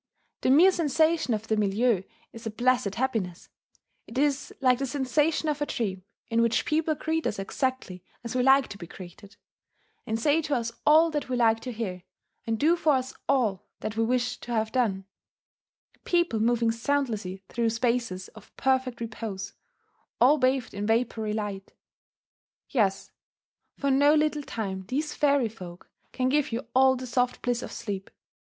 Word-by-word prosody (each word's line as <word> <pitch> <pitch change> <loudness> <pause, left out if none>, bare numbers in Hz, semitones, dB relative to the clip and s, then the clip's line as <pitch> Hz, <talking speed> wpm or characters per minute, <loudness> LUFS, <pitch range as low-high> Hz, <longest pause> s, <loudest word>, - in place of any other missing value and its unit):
The - - +1
mere 330 +8 +7
sensation 320 -3 +1
of 215 +1 -6
the 220 - +1
milieu 210 0 +2 0.3
is 230 0 -8
a - - -1
placid 240 -2 +1
happiness: 225 -9 -2 0.6
it 235 - -8
is 285 0 +1
like 255 -2 +3
the 275 - -1
sensation 290 +4 0
of 295 -1 -1
a 290 - 0
dream 190 -7 -3 0.2
in 230 0 +1
which 230 -1 +2
people 310 0 +1
greet 320 +2 -1
us - - -2
exactly 195 -3 -3 0.2
as 235 +1 -5
we 255 - +2
like 270 +1 +5
to 200 - -9
be 170 - -8
greeted, 185 +3 -12 0.7
and 220 0 -1
say 295 +6 +3
to 300 -2 -1
us 230 -1 -2 0.2
all 320 +2 +6
that 295 -3 -3
we 255 - 0
like 225 -2 +3
to 250 +2 -6
hear, 205 -6 -4 0.5
and 225 0 0
do 320 +8 +4
for 315 -3 +2
us 260 -1 -1 0.2
all 230 -9 +1
that 215 - -4
we 225 - +1
wish 245 +1 0
to 240 - -8
have 220 -1 0
done, 205 -7 0 1.0
people 345 -10 +1
moving 230 0 +2
soundlessly 225 -7 -2
through 235 -1 0
spaces 230 -5 -1
of - - -17
perfect 260 -2 0
repose, 220 -4 -5 0.7
all 280 +5 +5
bathed 260 -1 +1
in 205 +1 -3
vapoury 225 -1 0
light. 205 -2 -5 0.9
Yes 200 -7 0 0.7
for 280 -1 0
no 285 +3 +5
little 305 -1 +1
time 195 -8 -5
these 295 +6 -2
fairy 280 -4 +2
folk 180 -5 -11 0.2
can 255 -1 0
give 290 0 +1
you 235 +4 -3
all 260 0 +5
the 255 0 -6
soft 250 0 -1
bliss 245 -1 0
of - - -7
sleep. 195 -3 -5
245 Hz, 170 wpm, -27 LUFS, 220-275 Hz, 1.0 s, mere